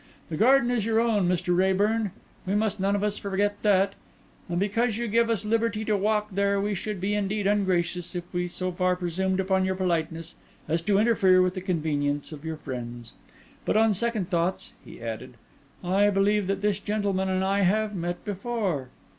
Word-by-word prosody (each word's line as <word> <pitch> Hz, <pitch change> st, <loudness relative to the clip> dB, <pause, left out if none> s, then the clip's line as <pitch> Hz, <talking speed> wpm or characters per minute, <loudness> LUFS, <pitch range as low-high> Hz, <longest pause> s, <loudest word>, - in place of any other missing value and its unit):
The -, -, -1 dB
garden 250 Hz, -, +4 dB
is 240 Hz, -4 st, +1 dB
your 225 Hz, +1 st, +2 dB
own, 220 Hz, -5 st, +2 dB
Mr. 180 Hz, 0 st, +1 dB
Raeburn; 200 Hz, +4 st, +2 dB, 0.4 s
we 195 Hz, -, +1 dB
must 210 Hz, -1 st, 0 dB
none 195 Hz, +1 st, +1 dB
of 205 Hz, -, -1 dB
us 210 Hz, 0 st, -1 dB
forget 205 Hz, +1 st, -1 dB
that; 195 Hz, -1 st, +3 dB, 0.6 s
and 175 Hz, -, -1 dB
because 215 Hz, +3 st, 0 dB
you 235 Hz, 0 st, -2 dB
give 230 Hz, +2 st, +2 dB
us 220 Hz, -2 st, 0 dB
liberty 225 Hz, 0 st, 0 dB
to 215 Hz, -, +1 dB
walk 210 Hz, +1 st, 0 dB
there 200 Hz, +1 st, +1 dB
we 205 Hz, +1 st, -1 dB
should 205 Hz, +1 st, -4 dB
be 195 Hz, +3 st, -1 dB
indeed 205 Hz, 0 st, -1 dB
ungracious 180 Hz, -3 st, 0 dB
if 175 Hz, -, -2 dB
we 175 Hz, 0 st, -1 dB
so 185 Hz, +1 st, -3 dB
far 180 Hz, 0 st, +1 dB
presumed 185 Hz, +2 st, -1 dB
upon 190 Hz, 0 st, +1 dB
your 190 Hz, 0 st, 0 dB
politeness 165 Hz, -2 st, -2 dB, 0.3 s
as 165 Hz, +2 st, 0 dB
to 200 Hz, +2 st, +2 dB
interfere 200 Hz, -4 st, +4 dB
with 185 Hz, 0 st, +3 dB
the 185 Hz, -, -5 dB
convenience 150 Hz, -5 st, -1 dB
of 150 Hz, -1 st, -9 dB
your 160 Hz, -1 st, -4 dB
friends. 120 Hz, -4 st, -7 dB, 0.5 s
But, -, -, +1 dB
on 220 Hz, -1 st, +4 dB
second 215 Hz, -3 st, -1 dB
thoughts," 175 Hz, +2 st, -1 dB
he -, -, -12 dB
added, 115 Hz, +2 st, -6 dB, 0.5 s
"I 195 Hz, +3 st, +3 dB
believe 200 Hz, 0 st, +2 dB
that 195 Hz, 0 st, -2 dB
this 210 Hz, -1 st, +1 dB
gentleman 200 Hz, -2 st, -1 dB
and 185 Hz, 0 st, 0 dB
I 195 Hz, +1 st, +1 dB
have 210 Hz, +3 st, +2 dB
met 175 Hz, 0 st, -4 dB
before. 195 Hz, -, -2 dB
195 Hz, 190 wpm, -26 LUFS, 180-210 Hz, 0.6 s, garden